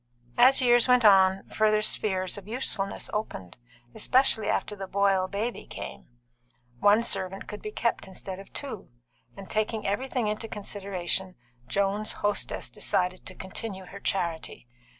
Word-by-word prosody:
As 260 +1 +7
years 240 0 +5
went 250 -2 +5
on, 190 -1 +6
further 215 0 +2
spheres 190 -4 +1
of 205 -1 -7
usefulness 215 -4 -2
opened, 155 - -4 0.4
especially 255 -4 +2
after 210 - -1
the 195 -1 -6
Boyle 195 -1 +2
baby 215 +5 -3
came; - - -8 0.7
one 205 - +5
servant 195 -3 -2
could 210 - -7
be 215 - -5
kept 230 -1 -1
instead 190 0 -7
of 195 - -12
two; 255 -9 -6 0.5
and 195 -1 -9
taking 215 0 -1
everything 250 +4 -1
into 215 +2 -2
consideration, 190 -3 -2 0.3
Joan's 200 +2 0
hostess 205 0 -1
decided 180 0 -1
to 185 - -7
continue 190 +1 -6
her 200 +2 -10
charity. 170 - -2
200 Hz, 140 wpm, -27 LUFS, 190-220 Hz, 0.7 s, As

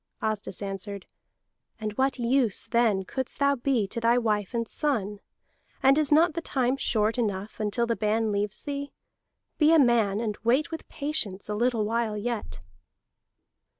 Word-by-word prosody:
Asdis 210 -3 -3
answered: 195 0 -5 0.7
"And 215 -1 -3
what 265 +5 0
use 240 -3 +1
then 225 -5 +2
couldst 260 +5 -3
thou 280 0 +3
be 250 -4 0
to 235 - -3
thy 230 +1 +3
wife 215 -2 0
and 230 -1 -1
son; 210 -9 -1 0.6
and 270 +1 +6
is 305 -1 +1
not 320 +3 +5
the 335 - -3
time 260 -4 0
short 225 -3 +1
enough 205 -2 -3
until 215 +3 0
the 230 0 0
ban 215 +1 0
leaves 205 0 -2
thee? 285 0 -5 0.7
Be 305 0 +5
a 330 - +6
man, 230 -7 +3
and 215 -2 -3
wait 255 +8 +2
with 325 - -7
patience 225 -11 -3
a - - -1
little 230 0 +1
while 225 -1 -1
yet!" 205 - -4
230 Hz, 160 wpm, -27 LUFS, 210-265 Hz, 0.7 s, and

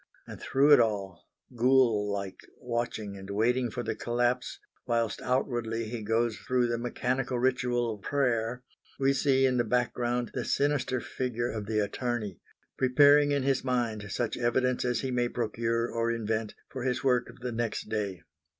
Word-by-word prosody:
And - - -10
through 140 +3 +3
it - - +8
all, 100 -6 -1 0.3
ghoul 120 -4 +3
like, 100 -1 -4 0.2
watching 115 -4 -3
and 95 0 -10
waiting 120 +5 +1
for 120 +2 -4
the - - -2
collapse, 120 +1 -1 0.3
whilst 115 -3 0
outwardly 115 -3 -1
he 115 -1 -4
goes 115 +1 0
through 125 -1 +1
the 120 -1 -1
mechanical 125 +1 -1
ritual 125 -2 +1
of 105 - -11
prayer, 125 -3 0 0.4
we 135 0 +3
see 135 -1 +3
in 130 -1 +2
the 120 - +3
background 120 +1 0
the - - -2
sinister 140 -3 0
figure 120 -1 -3
of 105 -2 -5
the 110 0 -1
attorney, 105 -2 -3 0.4
preparing 145 +3 +5
in 140 -2 +1
his 135 -1 +1
mind 115 -6 -1
such 120 +1 -2
evidence 125 +1 +1
as 125 -1 0
he 130 - -2
may 120 -1 +1
procure 115 0 -1
or 115 0 0
invent 110 -1 -2
for 130 - -7
his 125 +1 -1
work 125 -2 +2
of 120 +1 -14
the 125 0 -3
next 115 -2 -3
day. 100 -5 -3
120 Hz, 170 wpm, -29 LUFS, 110-125 Hz, 0.4 s, it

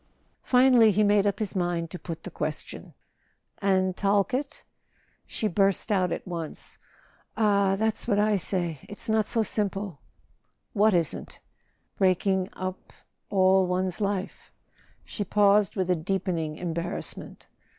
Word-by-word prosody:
Finally 250 -3 +5
he 210 +1 +3
made 205 0 +3
up 200 - 0
his 210 -3 -3
mind 175 -2 -1
to 180 - -7
put 165 -2 -7
the - - -7
question: - - -5 0.6
"And 190 -2 +1
Talkett?" 205 +8 0 0.6
She 220 - -1
burst 195 +2 +1
out 185 -4 +2
at - - -4
once: 165 -3 -6 0.6
"Ah, 200 -3 +3
that's 220 +2 0
what 205 -4 +2
I 210 0 +3
say— 175 -5 -2
it's 205 +3 -8
not 220 -1 +2
so 225 - +1
simple 200 -5 -2 0.4
!" - - -45 0.3
"What 210 -1 +4
isn't?" 165 -4 -2 0.6
"Breaking 190 0 +2
up—all 185 0 -1
one's 180 +1 -1
life." 200 -2 -3 0.5
She 205 - -4
paused 205 0 +3
with 185 -2 0
a - - +3
deepening 170 -2 -2
embarrassment. 170 0 -4
195 Hz, 130 wpm, -27 LUFS, 180-210 Hz, 0.6 s, Finally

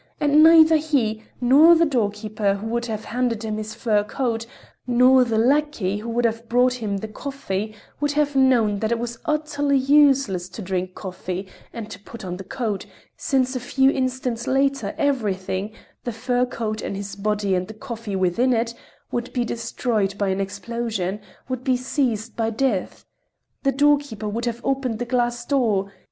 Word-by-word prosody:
And 295 0 +4
neither 320 0 +8
he, 260 -9 0 0.2
nor 290 +7 +7
the 335 0 +4
doorkeeper 210 -5 0
who 200 +2 -7
would 235 +1 -1
have 215 -2 -4
handed 235 -1 -1
him 215 -1 -2
his 215 0 -5
fur 210 -3 +1
coat, 230 0 -2 0.4
nor 250 +1 +6
the 230 -2 -1
lackey 240 -5 +1
who 230 +2 -6
would 235 +1 0
have 230 0 -2
brought 250 +1 +3
him 200 -2 -1
the 220 - -5
coffee, 215 -3 -4 0.2
would 290 0 0
have 290 -1 +1
known 240 -6 +3
that 220 +2 -1
it 235 - +2
was 235 0 -5
utterly 290 -2 +1
useless 270 -9 +3
to 215 - -8
drink 185 0 -3
coffee, 185 0 -5 0.2
and 225 -2 -7
to 185 - -8
put 205 +1 -10
on 180 -1 -4
the 195 - -7
coat, 225 -3 -3 0.3
since 260 -3 0
a - - -1
few 265 +2 +2
instants 255 -3 -2
later, 270 -5 +1
everything—the 215 -4 -2
fur 245 +2 0
coat 220 -3 -3
and - - -4
his 200 0 -6
body 205 -1 0
and 180 0 0
the 220 - -9
coffee 230 -4 -6
within 190 +8 +2
it—would 235 +1 -4
be 245 -2 0
destroyed 220 -4 -1
by 200 -1 0
an 190 +1 0
explosion, 200 0 -3 0.3
would 255 -1 -4
be 255 -1 +2
seized 245 -4 -1
by 225 -1 0
death. 225 -4 -1 0.6
The 275 - +2
doorkeeper 280 -6 +1
would 230 +3 -3
have 235 0 -3
opened 265 -4 -1
the 245 - -3
glass 240 -1 0
door.... 215 -8 +1
235 Hz, 170 wpm, -23 LUFS, 210-265 Hz, 0.6 s, neither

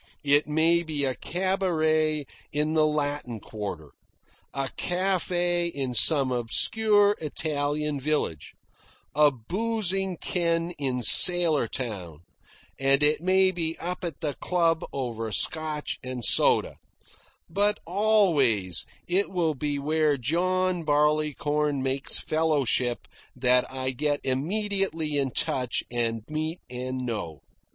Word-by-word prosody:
It 145 +1 +3
may 160 +3 +3
be 155 -4 -2
a 130 - 0
cabaret 160 -4 0 0.3
in 150 +1 0
the 155 -1 +3
Latin 145 -6 -2
Quarter, 100 -9 -7 0.6
a 135 -1 -3
cafe 175 -1 0
in 135 -6 -3
some 135 +1 +4
obscure 205 - +2
Italian 150 -1 -2
village, 135 - -2 0.6
a 150 +1 +5
boozing 190 - -2
ken 170 -1 -1
in 130 -3 -2
sailor 155 - +5
town, 95 - -5 0.6
and 135 +1 +3
it 150 +2 +3
may 185 +1 +3
be 165 -2 -2
up 180 +2 -5
at 170 -2 -5
the 150 -3 -2
club 165 -2 +1
over 115 -4 -4
Scotch 155 +4 -1
and 130 -2 -5
soda; - - +3 0.7
but 205 +4 +1
always 160 - +2 0.2
it 190 +3 +1
will 170 -4 0
be 145 +1 -2
where 150 0 +1
John 180 +6 0
Barleycorn 150 -1 0
makes 135 +1 -1
fellowship 145 -6 0 0.3
that 125 0 +3
I 130 0 -2
get 145 +3 -1
immediately 165 +1 -1
in 135 -1 0
touch, 125 0 -1
and 115 -2 -1
meet, 155 +2 -3
and 130 +1 -4
know. 85 - -5
150 Hz, 115 wpm, -26 LUFS, 130-175 Hz, 0.7 s, a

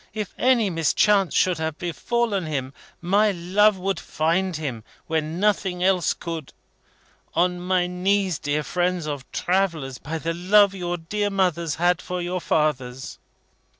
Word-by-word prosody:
If 210 -4 -4
any 240 -6 +3
mischance 185 +4 +2
should 180 -3 +2
have 160 -1 -3
befallen 200 +2 -1
him, 135 -3 -3 0.3
my 205 +5 +3
love 195 +4 +3
would 190 -1 -2
find 170 +3 0
him, 135 -8 -4 0.2
when 160 +1 -2
nothing 195 -3 +1
else 185 -2 +2
could. 165 -4 -6 0.8
On 180 +1 +2
my 180 0 +1
knees, 185 -1 0
dear 145 +1 -1
friends 180 -1 -1
of 145 -3 -6
travellers! 170 -9 -1
By 160 +3 -4
the 165 +1 -2
love 195 +3 +4
your 175 -2 -3
dear 205 +5 -2
mothers 175 -5 0
had 175 -2 +2
for 180 0 -4
your 180 +1 -3
fathers!" 135 -6 -1
175 Hz, 145 wpm, -23 LUFS, 160-195 Hz, 0.8 s, love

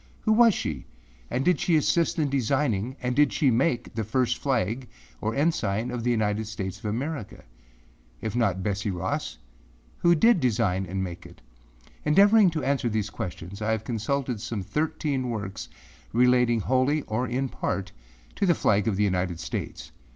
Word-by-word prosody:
Who 220 - +2
was 230 -2 +6
she? 75 -4 -4 0.4
And 130 - -1
did 180 - +3
she 170 - +2
assist 165 +3 +2
in 155 -3 +2
designing 130 -3 0
and 125 0 -1
did 145 -1 +4
she 140 -4 +2
make 120 0 0
the 110 -1 -2
first 125 +3 0
flag 125 -2 -1 0.3
or 110 +1 -1
ensign 125 -7 0
of 120 -2 -4
the 120 - +1
United 110 -2 0
States 100 -2 -5
of - - -13
America? 120 +3 -4 0.8
If 110 0 -4
not 100 -6 +1
Betsey 100 0 -1
Ross, 90 -9 -3 0.6
who 170 0 +4
did 225 +4 +5
design 105 - +1
and 95 +2 -2
make 85 -2 -7
it? - - -17 0.6
Endeavoring 200 +5 +6
to 160 -3 -3
answer 135 -3 +1
these 105 -2 -2
questions, 90 +2 -6
I 105 - -1
have 110 -1 -2
consulted 120 +1 -2
some 115 -4 -4
thirteen 145 - -1
works 100 -4 -5 0.4
relating 125 -1 +4
wholly 130 +6 +1
or 110 +4 -2
in 130 +3 -1
part 95 -5 -3 0.5
to 200 - +1
the 175 - +4
flag 105 -4 +2
of 110 - +1
the 105 - +1
United 90 -3 0
States. - - -5
120 Hz, 170 wpm, -26 LUFS, 105-140 Hz, 0.8 s, was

